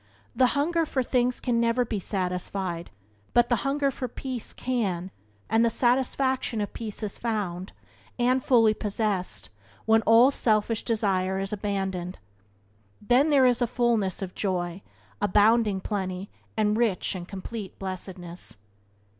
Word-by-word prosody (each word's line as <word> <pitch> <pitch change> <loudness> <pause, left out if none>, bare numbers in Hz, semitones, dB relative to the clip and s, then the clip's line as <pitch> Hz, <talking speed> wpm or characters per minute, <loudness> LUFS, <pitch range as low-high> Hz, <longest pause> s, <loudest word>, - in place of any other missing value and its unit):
The 255 - +5
hunger 330 +3 +2
for 270 -4 -1
things 250 0 +1
can 240 -2 0
never 235 +1 +2
be 220 -3 -2
satisfied, 180 -2 -3 0.5
but 240 0 +5
the 240 - +3
hunger 275 +4 0
for 255 0 -4
peace 250 0 -4
can 195 -8 -2 0.4
and 225 +1 +3
the 235 - +4
satisfaction 255 0 +1
of 205 - -3
peace 220 -1 -6
is 205 - -4
found, 200 -6 -3 0.5
is 255 +1 +2
fully 225 -4 +5
possessed, 200 - -2 0.3
when 220 0 +5
all 230 +5 +6
selfish 220 -3 +2
desire 190 -4 0
is 195 +2 -3
abandoned. 190 -3 -3 0.8
Then 250 +8 +3
there 275 -3 +5
is 245 -1 +4
fullness 235 -6 +1
of 185 - -6
joy, 180 -2 -2 0.4
abounding 210 0 +3
plenty, 190 -1 -3 0.3
and 210 -1 +2
rich 220 -5 +1
and 180 -2 -6
complete 195 +1 -7
blessedness. 185 - -6
215 Hz, 135 wpm, -26 LUFS, 190-245 Hz, 0.8 s, all